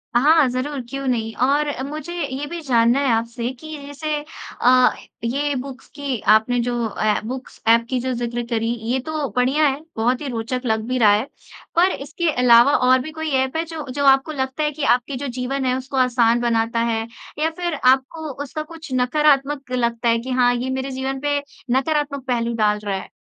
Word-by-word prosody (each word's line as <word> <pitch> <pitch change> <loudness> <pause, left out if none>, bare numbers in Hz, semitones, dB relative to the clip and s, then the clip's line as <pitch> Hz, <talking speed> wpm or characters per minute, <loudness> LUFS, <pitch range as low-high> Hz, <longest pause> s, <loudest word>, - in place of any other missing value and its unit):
हाँ, 300 +3 +5
ज़रूर 265 +3 -3
क्यों 275 +1 -5
नहीं। 225 -3 -1
और 290 +3 +2 0.2
मुझे 310 +3 -6
ये 285 -5 -3
भी 340 0 -5
जानना 240 -2 +3
है 275 -2 +1
आपसे 235 +1 -2
कि 310 -1 -8
जैसे 300 +2 -3 0.5
अ, 255 0 +6 0.3
ये 280 +5 0
बुक्स 260 0 -7
की 280 -5 -3
आपने 240 +3 +2
जो 240 -1 -1
अ, 215 0 0
बुक्स 255 +3 -7
ऐप 230 +1 +5
की 255 -1 0
जो 255 +1 -2
ज़िक्र 240 0 -3
करी 230 0 0 0.2
ये 260 - +1
तो 310 -3 -2
बढ़िया 265 +5 +3
है, 275 0 -1 0.2
बहुत 245 +4 +1
ही 285 - -4
रोचक 240 +1 -3
लग 220 -1 +1
भी 255 - -1
रहा 215 -4 +6
है। 210 +2 +2 0.5
पर 360 +3 +4
इसके 320 +4 -2
अलावा 245 +1 +5 0.2
और 255 0 +6
भी 310 +4 -7
कोई 315 0 -4
ऐप 265 +3 -5
है 325 - 0
जो-जो 285 -4 -4
आपको 270 +3 +4
लगता 265 +1 -2
है 300 - +1
कि 295 0 -6
आपके 250 +2 -6
जो 280 +2 -4
जीवन 265 +1 -2
है 255 - +1
उसको 265 +1 -5
आसान 240 -2 +3
बनाता 230 -1 +1
है? 225 0 -2 0.3
या 315 +1 +2
फिर 345 +1 -3
आपको 265 +5 +2
उसका 305 +2 -5
कुछ 320 -2 -10
नकारात्मक 275 +1 +2
लगता 235 -1 0
है 230 - +3
कि 255 +3 -6
हाँ 245 0 +4
ये 250 +2 -3
मेरे 265 +1 -3
जीवन 265 +1 -3
पे 290 0 +1 0.4
नकारात्मक 280 -1 -1
पहलू 235 -1 0
डाल 210 -1 +2
रहा 200 -1 -1
है? - - -8
260 Hz, 200 wpm, -21 LUFS, 240-290 Hz, 0.5 s, अ